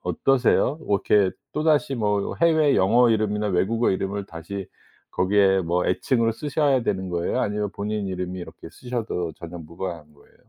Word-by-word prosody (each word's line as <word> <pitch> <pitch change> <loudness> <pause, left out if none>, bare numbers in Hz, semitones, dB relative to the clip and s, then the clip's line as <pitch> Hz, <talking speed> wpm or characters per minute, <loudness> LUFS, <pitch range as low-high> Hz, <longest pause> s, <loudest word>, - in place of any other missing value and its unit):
어떠세요? 125 - +2
뭐 105 -11 -1
이렇게 100 -3 +4 0.2
또다시 150 -3 +1
뭐 105 -4 -1
해외 160 -3 +4
영어 115 +6 +4
이름이나 105 -1 0
외국어 105 +5 +1
이름을 100 +1 -2
다시 90 +4 -7 0.4
거기에 95 0 +3
뭐 90 0 0
애칭으로 115 -4 +1
쓰셔야 140 0 +1
되는 95 -4 -2
거예요? 85 0 -1
아니면 105 0 -1
본인 105 0 -3
이름이 90 -1 -4
이렇게 80 -1 -10
쓰셔도 115 -9 -4
전혀 85 +1 -8
무관한 85 -1 -7
거예요? 70 - -24
100 Hz, 380 characters per minute, -24 LUFS, 90-120 Hz, 0.4 s, 이렇게